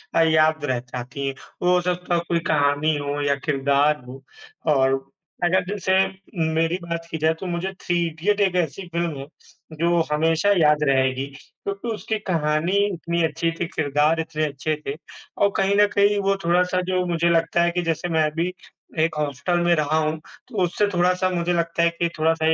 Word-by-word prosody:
अ, 165 - +5
याद 155 -1 +3
रह 130 -3 0
जाती 125 +2 -6
हैं। 135 - -3 0.3
वो 180 0 +3
हो 180 - +3
सकता 180 0 -1
है - - +2
कोई 170 -1 +1
कहानी 145 +1 +2
हो 145 0 -3
या 140 -1 +2
किरदार 140 0 +1
हो 135 +2 -10 0.5
और 135 0 +2 0.4
अगर 185 +1 +3
जैसे 190 -1 -1 0.6
मेरी 165 +2 +1
बात 170 -1 -5
की 160 - -2
जाए, 160 +1 +2
तो 165 +4 -9
मुझे 175 +2 -2
थ्री 175 - -1
इडियट 170 +6 -1
एक 190 -2 +2
ऐसी 180 +2 -1
फ़िल्म 170 -4 -1
है, 135 - -6 0.5
जो 170 0 +3
हमेशा 160 +5 +2
याद 150 -2 +4
रहेगी 130 0 +1 0.2
क्योंकि 200 +3 -7
उसकी 220 0 -3
कहानी 160 +2 +1 0.2
इतनी 170 0 -1
अच्छी 165 +1 -1
थी, 165 +1 -3
किरदार 150 0 +1
इतने 160 -1 -1
अच्छे 150 +2 -2
थे। 140 - -3 0.4
और 200 - +3
कहीं 195 +1 +2
न 205 - +6
कहीं 205 0 +4
वो 195 - +3
थोड़ा-सा 180 +1 +2
जो 185 -1 +1
मुझे 170 -1 +1
लगता 165 0 +2
है 175 - +2
कि 180 +1 -1
जैसे 165 +3 -3
मैं 160 -2 +2
भी 170 +2 0 0.5
एक 165 - -3
हॉस्टल 150 +4 -1
में 175 - +4
रहा 155 0 +1
हूँ, 155 0 0 0.3
तो 210 -7 -1
उससे 190 +4 +1
थोड़ा-सा 180 +1 +2
मुझे 175 -1 0
लगता 170 0 0
है 170 - +5
कि 170 -1 +1
थोड़ा-सा 160 0 +2
165 Hz, 190 wpm, -23 LUFS, 150-180 Hz, 0.6 s, न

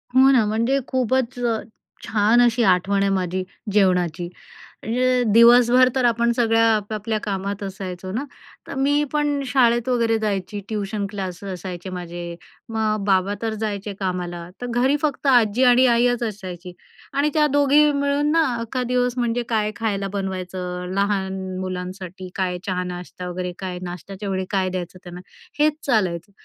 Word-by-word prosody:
हो 265 +1 +7
ना, 245 -5 +4
म्हणजे 230 +6 +1
खूपच 255 -1 0
अ, 230 -2 0 0.4
छान 220 +3 +3
अशी 240 0 +3
आठवण 195 0 +3
आहे 200 - +2
माझी 185 0 -1 0.3
जेवणाची. 180 -4 +2 0.6
अ, - - -9 0.5
दिवसभर 245 +2 +7
तर 255 -2 +2
आपण 235 0 +2
सगळ्या 225 -2 +3
आपापल्या 215 +1 -2
कामात 200 0 -3
असायचो 185 -1 -6
ना. 235 +8 -2 0.4
तर - - -6
मी 285 +2 +2
पण 295 -1 0
शाळेत 240 -2 +3
वगैरे 230 -2 +2
जायची, 205 -1 -2
ट्यूशन 205 -1 -2
क्लास 190 -3 -5
असायचे 185 -1 -6
माझे. 175 -1 -6 0.3
मग 215 -2 -1
बाबा 195 0 +2
तर 225 -1 -1
जायचे 205 -1 -3
कामाला, 175 -2 -3
तर 245 - -3 0.2
घरी 265 +3 +3
फक्त 290 -2 -1
आजी 240 -2 +4
आणि 250 +1 +6
आईच 245 0 +2
असायची. 185 -5 -6 0.4
आणि 285 +2 +2
त्या 305 -1 +4
दोघी 285 +1 +4
मिळून 285 +1 +1
ना 325 +1 +4 0.2
अख्खा 230 +2 -3
दिवस 250 0 0
म्हणजे 240 0 0
काय 215 -2 +1
खायला 200 -3 -2
बनवायचं, 185 -2 -4
लहान 195 -1 0 0.2
मुलांसाठी 185 0 -6
काय, 185 -2 -1
चहा 180 -2 -1
नाश्ता 180 0 -7
वगैरे, 180 0 -4
काय 180 -2 -5
नाश्त्याच्या 185 +3 -6
वेळी 190 -1 -1
काय 190 -2 0
द्यायचं 185 0 -5
त्यांना, 180 0 -9 0.4
हेच 305 0 +4
चालायचं. 190 -7 0
205 Hz, 150 wpm, -22 LUFS, 185-245 Hz, 0.6 s, हो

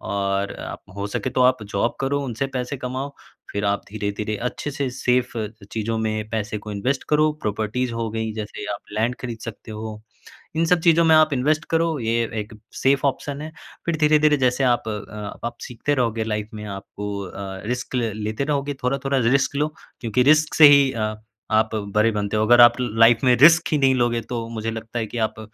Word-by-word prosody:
और 100 0 -1
अ, - - -7 0.2
हो 100 0 -3
सके 125 +5 -3
तो 125 0 +1
आप 125 -3 +3
जॉब 100 +3 -1
करो, 140 +1 0
उनसे 125 +2 -2
पैसे 125 +3 -3
कमाओ, 130 +3 -5 0.4
फिर 100 0 -2
आप 100 0 0
धीरे-धीरे 105 0 -3
अच्छे 145 - -6
से 140 -1 -2
सेफ़ 125 -1 0 0.4
चीजों 115 0 -2
में 110 -1 -2
पैसे 110 -1 -2
को 105 0 -8
इन्वेस्ट 130 +7 -1
करो, 150 0 +4
प्रॉपर्टीज 110 +4 -1
हो 115 -1 -3
गई 110 0 -3
जैसे 105 -1 -6
आप 100 - -6
लैंड 115 +4 0
खरीद 120 -3 -5
सकते 115 0 -8
हो। 110 0 -6 0.6
इन 165 +1 +2
सब 180 +1 +3
चीजों 170 0 +5
में 160 -1 +6
आप 155 -2 +5
इन्वेस्ट 150 +5 +1
करो 165 -1 +1
ये 115 0 +1
अ, - - -14
एक 105 +1 -4 0.2
सेफ 135 +1 +2
ऑप्शन 140 +1 -2
है। 155 +1 -6 0.3
फिर 170 -1 0
धीरे-धीरे 150 -1 +4
जैसे 130 0 +1
आप 120 -3 +2
अ, 105 -1 -6
आप 120 0 -8
सीखते 125 +4 -2
रहोगे 115 -3 0
लाइफ 105 -1 -3
में 105 - -7
आपको 100 +1 -7 0.2
अ, 95 0 -7
रिस्क 130 +1 -5
ल 115 -3 0
लेते 110 +6 -2
रहोगे, 145 -1 -1
थोड़ा-थोड़ा 135 +1 0
रिस्क 135 +3 +2
लो 150 +2 0 0.3
क्योंकि 120 +2 +1
रिस्क 155 0 +3
से 155 -2 +10
ही 140 -2 +4
अ, 110 -1 -2 0.4
आप 110 +1 +2 0.2
बड़े 110 +1 +4
बनते 105 0 -2
हो। 110 - +2
अगर 120 +1 +7
आप 120 0 +9
लाइफ 115 0 +4
में 125 -1 +5
रिस्क 160 +4 +7
ही 150 - +3
नहीं 135 -2 +3
लोगे 120 -1 +1
तो 115 -2 -3
मुझे 115 0 -3
लगता 115 +1 -5
है 110 - -1
कि 120 - -7
आप 110 0 -16
120 Hz, 205 wpm, -22 LUFS, 110-140 Hz, 0.6 s, से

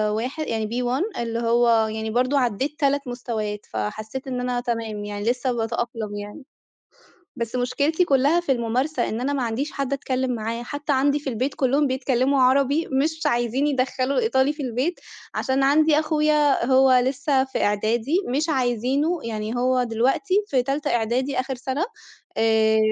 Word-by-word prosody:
واح 250 +7 -3
يعني 225 -8 -2
B1 245 +5 -1 0.2
اللي 230 -1 -2
هو 230 -1 +3
يعني 220 0 -4
برضه 255 +4 +2
عدّيت 260 +4 -1
3 280 -1 +1
مستويات، 220 -4 -4
فحسّيت 215 +5 -4
إن 255 -1 -3
أنا 250 -1 -1
تمام 225 -4 -3
يعني 205 0 -5
لسه 250 +1 0
باتأقلم 225 -2 -3
يعني. 205 +7 -8 0.9
بس 235 +1 -4
مشكلتي 280 +7 +1
كُلّها 285 +2 +3
في 345 -5 -2
المُمارسة، 250 +3 0
إن 225 - -3
أنا 280 +3 -1
ما 270 -3 -1
عنديش 240 +6 -2
حد 275 0 -2
أتكلّم 260 -2 -1
معاه، 230 +1 -4
حتى 290 +3 -3
عندي 280 +2 +2
في 280 -2 -4
البيت 260 +4 -2
كُلّهم 275 +2 +2
بيتكلّموا 260 +1 +1
عربي 275 +4 +3
مش 305 +4 0
عايزين 240 +4 +1
يدخّلوا 260 0 0
الإيطالي 265 +4 +2
في 300 -1 -6
البيت، 260 +8 -2 0.4
عشان 265 +1 0
عندي 300 +2 +4
أخويا 300 -4 +2
هو 265 +1 +5
لسه 270 0 +1
في 265 - -3
إعدادي 220 +7 0
مش 300 +5 0
عايزينه، 265 +5 0
يعني 220 0 -4
هو 255 +1 +2
دلوقتي 245 - 0
في 260 -7 +1
تالتة 285 +3 -1
إعدادي 245 +4 0
آخر 265 0 -2
سَنة 265 +5 -2 0.5
آآ، 220 -1 +3
255 Hz, 160 wpm, -23 LUFS, 230-280 Hz, 0.9 s, هو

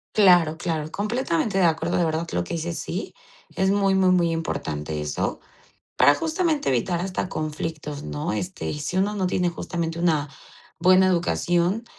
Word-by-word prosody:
Claro, 175 -6 +5
claro, 160 -3 -2
completamente 205 -3 -1
de 180 - +4
acuerdo, 165 +1 +1
de 175 - +2
verdad, 160 +1 -1
lo 90 - 0
que 170 - -5
dices 165 +1 -3
sí. 185 +4 -5 0.4
Es 190 0 +2
muy, 195 -1 +2
muy, 190 -1 +4
muy 175 -2 +3
importante 75 - -3
eso, 75 0 -2 0.6
para 145 +3 +6
justamente 320 - 0
evitar 170 +8 0
hasta 185 0 -3
conflictos, 155 -1 -4
¿no? 75 +3 -3
este, 180 - -4
y 150 - -4
si 175 +5 -3
uno 205 +2 +1
no 190 -2 0
tiene 180 -1 +1
justamente 170 -1 -4
una 155 -4 +1 0.5
buena 185 +1 +6
educación 175 +3 +1
170 Hz, 165 wpm, -24 LUFS, 155-190 Hz, 0.6 s, para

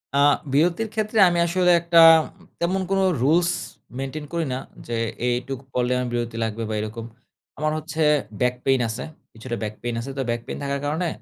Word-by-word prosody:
আ - - +3 0.4
বিরতির 170 +9 +2
ক্ষেত্রে 215 0 0
আমি 175 0 0
আসলে 180 +1 +3
একটা 170 0 +4 0.6
তেমন 185 +3 0
কোনো 195 0 +2 0.2
রুলস 170 +5 +3 0.5
মেইনটেইন 140 +3 -5
করি 170 -1 0
না 130 - -2 0.3
যে, 120 -1 -2 0.3
এইটুকু 125 +2 -2
পড়লে 125 0 0
আমার 125 - -1
বিরতি 120 -1 -3
লাগবে 110 0 -3
বা 110 - -2
এরকম। 110 +2 -5 0.5
আমার 155 +1 0
হচ্ছে 155 +1 -4 0.4
ব্যাক 125 0 +2
পেইন 135 -1 +3
আছে। 115 +3 -4 0.3
কিছুটা 120 +2 -6
ব্যাক 105 0 -3
পেইন 120 -1 -3
আছে। 135 - -7
তো 135 - 0
ব্যাক 120 0 -1
পেইন - - -5
থাকার 140 0 -2
কারণে 160 +4 -1
135 Hz, 180 wpm, -23 LUFS, 120-170 Hz, 0.6 s, একটা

